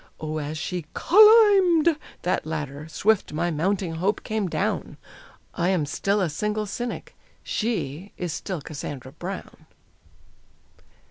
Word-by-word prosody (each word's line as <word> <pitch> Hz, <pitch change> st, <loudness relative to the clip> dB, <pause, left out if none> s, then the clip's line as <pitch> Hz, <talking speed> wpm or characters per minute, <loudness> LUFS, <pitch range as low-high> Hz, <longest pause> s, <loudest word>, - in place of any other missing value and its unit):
Oh, 155 Hz, 0 st, -3 dB
as 150 Hz, +1 st, -4 dB
she 175 Hz, -1 st, -4 dB
"cull 425 Hz, +5 st, +7 dB, 0.3 s
imbed!" 340 Hz, -4 st, +4 dB, 0.3 s
that 180 Hz, -, 0 dB
ladder, 150 Hz, -1 st, -5 dB
swift 210 Hz, 0 st, +1 dB
my 170 Hz, +3 st, 0 dB
mounting 180 Hz, +2 st, -1 dB
hope 195 Hz, +5 st, 0 dB
came 215 Hz, -4 st, -2 dB
down. -, -, -2 dB, 0.6 s
I 175 Hz, +2 st, 0 dB
am 180 Hz, -6 st, +1 dB
still 200 Hz, +7 st, 0 dB
a 185 Hz, -, +2 dB
single 210 Hz, +6 st, -1 dB
cynic; 240 Hz, +4 st, -5 dB, 0.3 s
she 200 Hz, -, -3 dB
is 175 Hz, -3 st, -3 dB
still 180 Hz, -1 st, -4 dB
Cassandra 135 Hz, -3 st, -7 dB
Brown! 175 Hz, +6 st, -8 dB
180 Hz, 130 wpm, -25 LUFS, 155-210 Hz, 0.6 s, cull